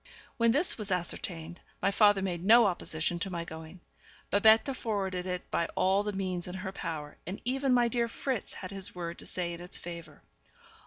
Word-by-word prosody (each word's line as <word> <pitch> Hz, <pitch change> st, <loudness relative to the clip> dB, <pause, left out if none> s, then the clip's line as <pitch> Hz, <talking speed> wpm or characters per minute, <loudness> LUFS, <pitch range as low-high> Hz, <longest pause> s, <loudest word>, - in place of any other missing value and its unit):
When 230 Hz, -1 st, +4 dB
this 290 Hz, +4 st, +3 dB
was 210 Hz, -1 st, -4 dB
ascertained, 175 Hz, -1 st, -2 dB, 0.2 s
my 195 Hz, -, +2 dB
father 205 Hz, -1 st, +5 dB
made 175 Hz, -3 st, -2 dB
no 230 Hz, +4 st, +7 dB
opposition 170 Hz, -2 st, -1 dB
to 195 Hz, -, -2 dB
my 170 Hz, -2 st, -4 dB
going; 160 Hz, +2 st, -9 dB, 0.5 s
Babette 220 Hz, +6 st, +5 dB
forwarded 190 Hz, -6 st, -2 dB
it 180 Hz, -1 st, -4 dB
by 170 Hz, -, +1 dB
all 190 Hz, +2 st, +3 dB
the 210 Hz, 0 st, -2 dB
means 185 Hz, -3 st, -2 dB
in 180 Hz, -, -6 dB
her 190 Hz, 0 st, -4 dB
power, 160 Hz, -6 st, -5 dB
and 190 Hz, +3 st, -4 dB
even 265 Hz, +2 st, +1 dB
my 245 Hz, -1 st, +5 dB
dear 235 Hz, 0 st, +1 dB
Fritz 250 Hz, 0 st, -3 dB
had 185 Hz, -, -7 dB
his 195 Hz, -2 st, -4 dB
word 170 Hz, -1 st, -5 dB
to -, -, -7 dB
say 175 Hz, -1 st, -2 dB
in 170 Hz, -, -8 dB
its 180 Hz, -, -4 dB
favour. 170 Hz, -3 st, -9 dB
185 Hz, 195 wpm, -30 LUFS, 175-215 Hz, 0.5 s, no